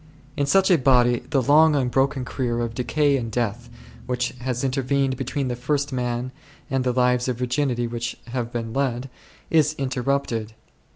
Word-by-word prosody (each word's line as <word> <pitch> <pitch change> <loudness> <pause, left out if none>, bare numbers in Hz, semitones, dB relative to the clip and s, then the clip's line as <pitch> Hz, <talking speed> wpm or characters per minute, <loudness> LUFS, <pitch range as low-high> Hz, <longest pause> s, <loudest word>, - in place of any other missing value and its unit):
In 140 - 0
such 190 +5 +4
a 175 - +5
body 125 -2 +4
the 135 -3 +2
long 155 +3 +5
unbroken 135 0 +1
career 120 -2 -2
of 115 -1 -3
decay 140 +4 +1
and 115 -3 -4
death, 120 +1 -2 0.4
which 125 -1 -1
has 125 0 -3
intervened 135 0 0
between 135 +2 -3
9 - - -2
the 120 0 -5
first 145 0 -1
man 125 0 -2 0.4
and 135 -1 +1
the 125 - +1
lives 125 0 +2
of 125 -2 -1
virginity 125 -1 0
which 120 0 -4
have 120 -1 -3
been 115 -2 -4
led, 130 -1 -1 0.4
is 155 -1 +3
interrupted. 130 -4 -1
125 Hz, 170 wpm, -23 LUFS, 120-140 Hz, 0.4 s, a